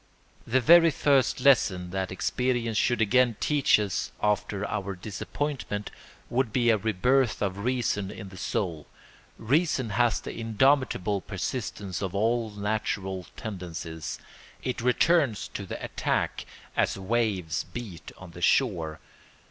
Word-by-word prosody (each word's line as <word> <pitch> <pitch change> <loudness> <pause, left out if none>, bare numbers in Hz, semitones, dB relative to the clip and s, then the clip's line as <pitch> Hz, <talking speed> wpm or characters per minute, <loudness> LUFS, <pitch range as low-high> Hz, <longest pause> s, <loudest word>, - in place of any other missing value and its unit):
The 130 +3 +2
very 165 +4 +7
first 135 -4 +2
lesson 95 -10 +3
that 95 0 -2
experience 120 +4 -1
should 120 +1 +2
again 120 +2 +3
teach 145 -6 +3
us 100 -3 -2
after 105 -1 0
our 100 -2 -3
disappointment 105 +3 -4 0.4
would 125 -1 0
be 120 0 +3
a 110 - +3
rebirth 115 +5 +2
of 100 -1 -2
reason 115 -4 -1
in 100 -1 -8
the 95 - -12
soul. 85 -4 -3 0.5
Reason 135 -1 +1
has 115 -1 +2
the - - -7
indomitable 115 -4 +2
persistence 100 -1 -4
of 95 -1 -3
all 115 +2 +1
natural 100 -3 -3
tendencies; 85 -6 -6 0.5
it 125 -2 -2
returns 125 - +2
to 100 - -6
the - - -5
attack - - -1 0.3
as - - +1
waves 95 -5 -1
beat 110 -9 -8
on 95 -2 -11
the 85 - -11
shore. 85 - +2
110 Hz, 130 wpm, -27 LUFS, 95-125 Hz, 0.5 s, very